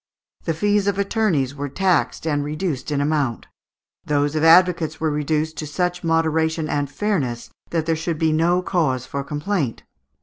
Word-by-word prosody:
The 165 - 0
fees 205 +3 +1
of 200 -1 +1
attorneys 195 - +1
were 145 0 -5
taxed 165 -6 0
and 145 -2 0
reduced 150 -2 -3
in 145 -1 0
amount. 145 -5 0 0.6
Those 145 0 0
of 155 - 0
advocates 165 -2 +5
were 160 -1 0
reduced 155 +1 -1
"to 155 - -4
such 180 +4 -2
moderation 160 -1 +1
and 145 -2 -1
fairness, 145 - -2 0.2
that 165 -2 -1
there 165 0 +1
should 165 0 -3
be 160 0 +2
no 175 +3 +2
cause 140 -10 0
for 140 +1 -4
complaint." 150 - -2
160 Hz, 165 wpm, -22 LUFS, 145-175 Hz, 0.6 s, advocates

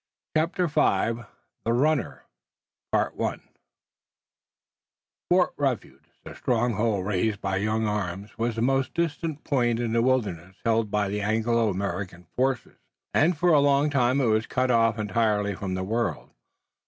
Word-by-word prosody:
CHAPTER 165 +3 +1
V 120 -7 +1 0.4
THE 115 - +1
RUNNER 145 +2 +1 0.7
Fort - - +1 2.4
Refuge, 135 -5 -2 0.2
the - - -9
stronghold 110 -4 0
raised 105 +1 0
by 95 -2 -1
young 110 +2 0
arms, 100 -1 -3
was 115 0 -1
the 115 - -1
most 135 +1 +1
distant 165 -2 -2
point 120 -4 +1
in 115 -2 -1
the 115 - +3
wilderness 100 -8 0
held 115 -2 +2
by 105 0 0
the 105 +1 -2
Anglo 110 +2 +1
American 95 -2 -4
forces, 130 -1 -1 0.4
and 165 +2 +3
for 175 +3 +2
a 150 - +6
long 140 +1 +3
time 130 -1 +2
it 135 - +2
was 110 -1 +2
cut 130 0 +1
off 115 -1 +3
entirely 105 -1 0
from 95 -1 -4
the 95 - -2
world. 115 +4 -2
115 Hz, 140 wpm, -26 LUFS, 105-130 Hz, 2.4 s, a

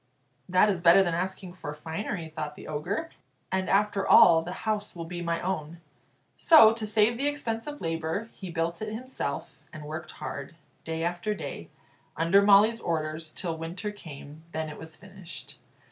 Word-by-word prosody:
"That 185 +3 +5
is 190 -4 0
better 175 +3 +7
than 175 -3 -1
asking 185 +1 -3
for 150 -5 -7
finery," 160 +3 -4
thought 150 -2 -4
the - - -11
Ogre; 180 - -3 0.4
"and 190 0 0
after 200 0 +2
all 165 -2 +8
the 175 +2 -6
house 210 -2 -1
will 170 -1 -6
be 175 +1 -6
my 170 -1 -1
own." 170 -3 -3 0.6
So, 225 -10 +8
to 225 -1 -4
save 220 +2 +3
the 280 - +1
expense 230 -6 -3
of 295 0 -7
labour, 165 +5 -2
he 190 - -8
built 170 +2 -2
it 215 0 -3
himself, 255 +4 -5
and 155 -2 -9
worked 155 +2 -6
hard, 140 +4 -7 0.3
day 160 0 -3
after 175 +5 -1
day, - - -7 0.5
under 170 +5 +5
Molly's 210 +3 +5
orders, 155 -1 -3
till 170 -1 -3
winter 175 +6 -5
came. 155 -5 -11
Then 160 0 -2
it 150 - -9
was 160 0 -9
finished. 195 -3 -11
175 Hz, 175 wpm, -28 LUFS, 160-210 Hz, 0.6 s, all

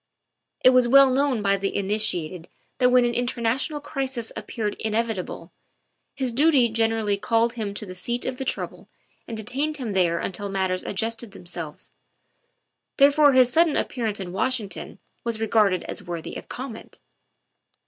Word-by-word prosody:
It 255 - +7
was 255 -1 +4
well 275 +1 +7
known 265 -4 +1
by 200 0 +3
the 195 0 -3
initiated 185 -5 -1 0.3
that 250 -1 +5
when 250 -1 +5
an 240 - 0
international 245 +4 -1
crisis 270 -5 -4
ap - - -7
peared 210 -3 -2
inevitable, 220 -6 -3 0.6
his 260 -3 -1
duty 270 -1 +4
generally 225 -2 +1
called 230 +3 +1
him 210 -4 -4
to 210 - -4
the 185 - -8
seat 235 +7 -3
of 260 -1 -3
the 265 - -3
trouble 265 - -4 0.4
and 230 - -5
detained 275 +8 -2
him 240 -7 -4
there 175 -3 +2
until 200 +4 -4
mat 190 -1 0
ters 185 - -1
adjusted 225 +1 -2
themselves. 170 -5 -6 1.1
Therefore 285 0 +6
his 255 -1 +5
sudden 330 0 +4
ap - - -1
pearance 225 -5 -3
in 185 -2 -5
Washington 220 0 -2 0.3
was 230 -2 -3
regarded 210 -5 +2
as - - -4
worthy 170 -2 -6
of - - -9
comment. 245 -3 -8
225 Hz, 160 wpm, -24 LUFS, 200-255 Hz, 1.1 s, It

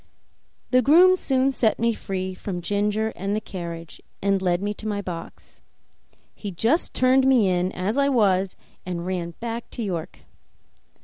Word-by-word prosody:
The 255 0 +5
groom 350 +8 +6
soon 270 -5 +2
set 230 -4 +1
me 230 0 +1
free 190 -3 -4
from 185 0 -5
Ginger 205 +4 0
and 195 +3 -2
the - - 0
carriage, 170 -5 -8 0.2
and 195 -1 +1
led 175 -2 +1
me 205 +2 -2
to 215 - -8
my 205 -1 -1
box. 175 -4 -8 0.7
He 205 - -6
just 225 - +1
turned 260 +1 +4
me 250 -7 +5
in 180 0 +1
as 205 +9 -1
I 280 0 +3
was 195 -7 +2 0.3
and 175 -1 -4
ran 175 -2 -3
back 235 0 -5
to 235 - -5
York. 180 -4 -5
205 Hz, 165 wpm, -24 LUFS, 185-235 Hz, 0.7 s, groom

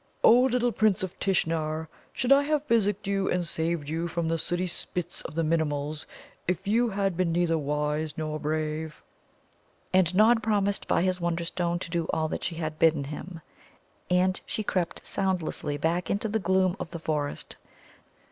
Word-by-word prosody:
Oh, 235 - +8
little 245 -1 +2
Prince 215 -3 +2
of 190 0 -5
Tishnar, 160 -4 0 0.2
should 250 - -1
I 275 +1 +8
have 300 0 0
physicked 210 -5 +1
you 195 -1 0
and 180 -1 0
saved 165 -2 -1
you 165 +3 -2
from 170 -1 -2
the 165 0 0
sooty 175 +3 0
spits 175 0 -3
of - - -8
the 165 - +1
Minimuls 155 -2 -1 0.4
if 180 0 -1
you 235 +3 +3
had 195 -2 0
been 180 -1 +1
neither 170 -1 +2
wise 150 +1 -1
nor 155 -1 -3
brave?" 155 0 -3 0.9
And 185 -1 +3
Nod 225 +3 +5
promised 205 -2 0
by - - +2
his 185 -1 0
Wonderstone 170 0 -1
to 170 -1 -6
do 170 -1 0
all 160 0 0
that - - -4
she 170 - -2
had 155 -1 -4
bidden 160 -3 +4
him. 160 +4 -7 0.7
And 185 +1 +2
she 215 - -2
crept 180 -4 -2
soundlessly 175 -6 -1
back 165 +3 0
into 205 +3 0
the 220 +1 0
gloom 190 -1 +2
of - - -5
the - - -6
forest. 150 -3 -3
170 Hz, 175 wpm, -27 LUFS, 160-195 Hz, 0.9 s, Oh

